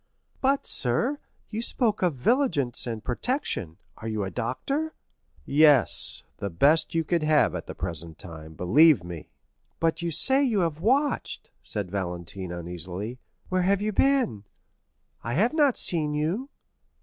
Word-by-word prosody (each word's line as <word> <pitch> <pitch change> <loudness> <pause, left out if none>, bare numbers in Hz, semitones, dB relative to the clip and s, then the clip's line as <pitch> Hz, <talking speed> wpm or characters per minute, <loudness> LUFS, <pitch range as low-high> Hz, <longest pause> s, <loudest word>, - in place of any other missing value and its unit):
"But, 275 +1 +1
sir, 235 - 0 0.3
you 220 +1 -3
spoke 230 -2 -1
of 175 -5 +1
vigilance 140 - 0
and 115 -2 -5
protection. 120 - -3 0.2
Are 110 - -8
you 110 -2 -2
a 95 - -4
doctor?" 275 - -3 0.5
"Yes; 145 -4 +4
the 100 - -4
best 150 - +2
you 165 - +2
could 170 +1 0
have 155 -1 +3
at - - -6
the - - -7
present 80 -1 -6
time, 80 -2 -10
believe 140 - +4
me." 85 -2 -9 0.5
"But 165 0 0
you 170 - -2
say 265 - +5
you 225 -8 +1
have 165 -2 -2
watched?" 275 - 0
said 100 -4 -1
Valentine 90 -1 -5
uneasily; 90 +7 -6 0.3
"where 185 0 +1
have 195 +2 +2
you 210 +1 -1
been?—I 110 - -3
have 220 - +2
not 290 -5 +3
seen 150 -4 +1
you." 175 - -2
150 Hz, 145 wpm, -26 LUFS, -, 0.5 s, say